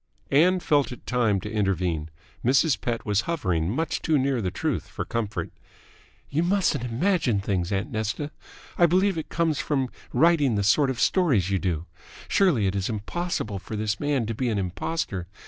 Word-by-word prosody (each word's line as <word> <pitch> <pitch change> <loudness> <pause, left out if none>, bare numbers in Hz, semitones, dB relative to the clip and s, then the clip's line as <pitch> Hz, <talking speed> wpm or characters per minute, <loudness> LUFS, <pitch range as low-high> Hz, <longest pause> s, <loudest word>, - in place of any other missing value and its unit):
Ann 180 +6 +5
felt 145 -6 +2
it 125 - -10
time 115 -5 +1
to 105 - -6
intervene. 90 -7 0 0.3
Mrs. 135 +4 +3
Pett 115 -1 -2
was 105 -2 +2
hovering 90 - 0
much 150 +8 -1
too 155 -2 +2
near 135 -2 +1
the 95 - -1
truth - - -2
for - - -5
comfort. 115 -3 -3 0.8
"You 150 +3 0
mustn't 175 -7 +1
imagine 125 - +1
things, 95 -2 -1
aunt 100 +2 -1
Nesta. 110 +7 -2 0.5
I 175 - +7
believe 185 +3 +2
it 160 - -5
comes 165 -3 0
from 135 -4 0 0.2
writing 155 -7 +3
the 100 - +1
sort 135 +8 +4
of 130 -3 -3
stories 125 - +2
you 95 - +2
do. 85 -4 -2 0.4
Surely, 165 - +3
it 95 0 0
is 95 -1 -1
impossible 110 - -3
for 110 - -7
this 105 0 -1
man 145 -5 0
to 115 - -3
be 125 +2 -1
an 110 - 0
impostor. 95 - -3
120 Hz, 180 wpm, -25 LUFS, 100-155 Hz, 0.8 s, I